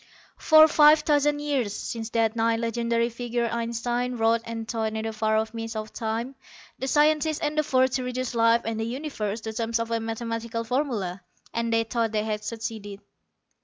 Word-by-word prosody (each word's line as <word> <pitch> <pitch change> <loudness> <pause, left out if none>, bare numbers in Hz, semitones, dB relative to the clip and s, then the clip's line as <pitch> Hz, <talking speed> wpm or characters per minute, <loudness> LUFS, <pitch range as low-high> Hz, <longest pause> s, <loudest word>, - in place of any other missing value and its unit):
] - - -33
PROLOGUE 315 0 +8
_For - - +3
five 300 +1 +7
thousand 295 -1 +2
years, 270 -8 -1
since 225 -1 -5
that 225 -1 +1
nigh 230 0 +2
legendary 235 0 0
figure 240 0 -2
Einstein 240 +1 -2
wrote 225 0 +2
and 225 -1 -5
thought 220 -1 -1
in 220 - -2
the 225 - -3
far 220 0 +1
off 220 +1 -1
mists 225 0 -5
of 215 0 -5
time, 230 +3 -3 0.5
the 265 - -3
scientists 305 +2 +3
endeavored 290 -4 +1
to 255 - -1
reduce 250 0 -3
life 230 0 +4
and 225 0 -2
the - - -1
universe 230 -4 -4
to 220 0 -5
terms 230 +1 -1
of 230 0 -3
a 230 - +1
mathematical 230 0 -4
formula. 230 -8 -2 0.3
And 230 0 -1
they 225 0 +3
thought 225 -1 -1
they 210 -1 +1
had 210 -1 -3
succeeded. 215 -2 -6
230 Hz, 190 wpm, -26 LUFS, 225-250 Hz, 0.5 s, PROLOGUE